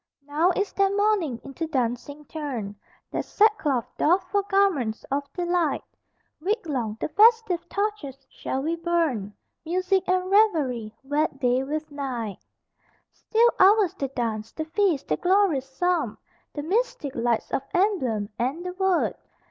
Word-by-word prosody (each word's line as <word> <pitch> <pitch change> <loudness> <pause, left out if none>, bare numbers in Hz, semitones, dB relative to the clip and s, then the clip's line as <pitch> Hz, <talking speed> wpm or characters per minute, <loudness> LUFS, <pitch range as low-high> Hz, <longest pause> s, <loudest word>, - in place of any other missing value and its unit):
Now 305 +5 +2
is 400 0 -1
their 395 0 +3
mourning 400 - +1
into 275 +4 -5
dancing 270 +2 -2
turned, 265 -11 -5 0.4
Their - - -1
sackcloth 340 - +2
doffed 360 +3 +2
for 405 - +3
garments 390 - +1
of 280 0 -2
delight, 350 -4 0 0.6
Week 390 +5 -1
long 240 -8 -2
the - - -1
festive 435 -3 +4
torches 365 -11 -3
shall 265 +1 -4
be 325 +3 0
burned, 330 - -1 0.3
Music 370 +3 +1
and 370 0 +2
revelry 295 - +2
wed 290 0 -1
day 250 0 +2
with 305 +2 -4
night. 245 -8 -4 0.7
Still 470 +2 +2
ours 395 -1 +5
the 275 - -3
dance, 225 -4 -3
the 315 - -5
feast, 340 -3 0
the - - 0
glorious 355 -8 +2
Psalm, 320 -5 0 0.4
The 290 - -4
mystic 360 - -1
lights 235 -1 -1
of - - 0
emblem, 265 - +1
and 275 +9 -2
the 360 - -4
Word. 380 -1 +1
315 Hz, 140 wpm, -25 LUFS, 265-380 Hz, 0.7 s, ours